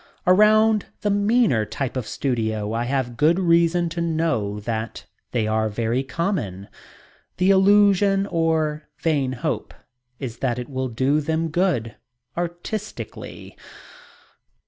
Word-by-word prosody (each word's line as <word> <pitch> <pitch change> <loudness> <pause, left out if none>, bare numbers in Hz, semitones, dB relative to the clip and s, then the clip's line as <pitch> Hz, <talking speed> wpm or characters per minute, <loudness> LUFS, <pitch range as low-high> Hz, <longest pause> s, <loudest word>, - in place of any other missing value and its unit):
Around 215 +3 +4
the 205 - +1
meaner 205 - +3
type 130 +4 -4
of 125 -4 -3
studio 110 -5 -2
I 115 +1 -1
have 125 -2 -2
good 160 +3 +4
reason 170 -1 +3
to 170 +1 -4
know 155 -12 -1
that 110 +1 -4 0.3
they 115 -3 0
are 110 0 0
very 115 +4 -1
common. 135 - -3 0.7
The 185 +2 +4
illusion 195 0 +4
or 160 -3 -1
vain 140 -5 0
hope 125 - -3 0.4
is 120 -3 -6
that 125 -3 -1
it 125 -1 -6
will 130 -1 -2
do 130 +6 +1
them 160 +2 -1
good 150 - 0 0.4
"artistically." 175 +5 -6
150 Hz, 125 wpm, -23 LUFS, 120-180 Hz, 0.7 s, Around